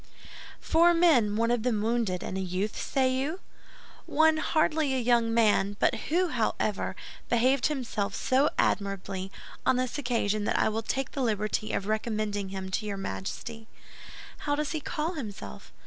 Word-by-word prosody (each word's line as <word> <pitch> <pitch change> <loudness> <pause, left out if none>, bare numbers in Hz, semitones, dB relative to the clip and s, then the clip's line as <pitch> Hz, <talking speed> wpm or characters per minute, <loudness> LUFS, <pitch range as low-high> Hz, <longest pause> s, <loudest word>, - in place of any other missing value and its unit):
"Four 340 +1 +4
men, 270 -12 +4
one 230 +2 +2
of 240 -2 +1
them 230 -2 0
wounded, 225 -5 0
and - - -4
a 190 - -1
youth, 190 +3 -2
say 260 -1 +1
you?" 285 +8 -2 0.7
"One 315 +1 +4
hardly 310 -3 +1
a - - +1
young 235 -2 +2
man; 205 -3 +3
but - - +3 0.2
who, 355 +3 +2
however, 220 -5 -1 0.3
behaved 250 +2 +3
himself 230 -8 -2
so 270 +3 +2
admirably 195 -1 -1 0.3
on - - +3
this 255 +2 -1
occasion 215 -5 0
that - - +1
I - - +3
will 220 +1 -2
take 270 +4 -2
the 275 - -3
liberty 215 -2 -1
of 195 - -2
recommending 215 -2 -2
him 190 -1 -5
to 215 +3 -2
your 200 -1 -3
Majesty." 195 - -5 0.7
"How 290 -1 0
does 300 0 -2
he 315 - -1
call 310 +3 -3
himself?" 205 - -8
230 Hz, 165 wpm, -28 LUFS, 205-275 Hz, 0.7 s, Four